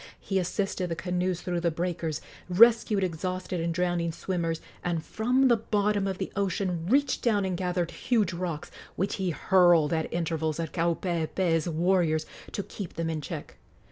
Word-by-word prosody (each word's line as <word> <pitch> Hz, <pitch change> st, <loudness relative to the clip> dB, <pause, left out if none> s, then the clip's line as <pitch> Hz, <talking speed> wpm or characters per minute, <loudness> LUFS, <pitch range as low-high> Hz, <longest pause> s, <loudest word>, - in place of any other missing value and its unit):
He 195 Hz, -1 st, -1 dB
assisted 185 Hz, 0 st, -1 dB
the 165 Hz, -, -2 dB
canoes 180 Hz, 0 st, -1 dB
through 175 Hz, -1 st, -1 dB
the 170 Hz, 0 st, +1 dB
breakers, 165 Hz, -2 st, -2 dB, 0.3 s
rescued 220 Hz, +1 st, +5 dB
exhausted 185 Hz, +1 st, -2 dB
and 170 Hz, 0 st, 0 dB
drowning 175 Hz, -1 st, 0 dB
swimmers, 165 Hz, -1 st, -2 dB, 0.2 s
and 170 Hz, -2 st, -1 dB
from 250 Hz, +4 st, +2 dB
the 235 Hz, -2 st, +5 dB
bottom 210 Hz, -2 st, +1 dB
of 190 Hz, -1 st, -2 dB
the 190 Hz, -, -4 dB
ocean 185 Hz, -4 st, -1 dB
reached 275 Hz, +4 st, +2 dB
down 210 Hz, -5 st, +2 dB
and 185 Hz, -1 st, -1 dB
gathered 180 Hz, -1 st, -1 dB
huge 215 Hz, -7 st, +1 dB
rocks, 170 Hz, -3 st, -4 dB, 0.2 s
which 195 Hz, +2 st, -1 dB
he 190 Hz, -2 st, -1 dB
hurled 175 Hz, -2 st, +4 dB
at 160 Hz, -1 st, -1 dB
intervals 160 Hz, -2 st, -1 dB
at 165 Hz, -2 st, -3 dB
Kaupeepee's 170 Hz, 0 st, 0 dB
warriors 165 Hz, -1 st, +2 dB, 0.3 s
to 200 Hz, -, -3 dB
keep 195 Hz, -2 st, -7 dB
them 165 Hz, -1 st, -1 dB
in 155 Hz, -1 st, -3 dB
check. 140 Hz, -, -7 dB
180 Hz, 165 wpm, -28 LUFS, 165-195 Hz, 0.3 s, rescued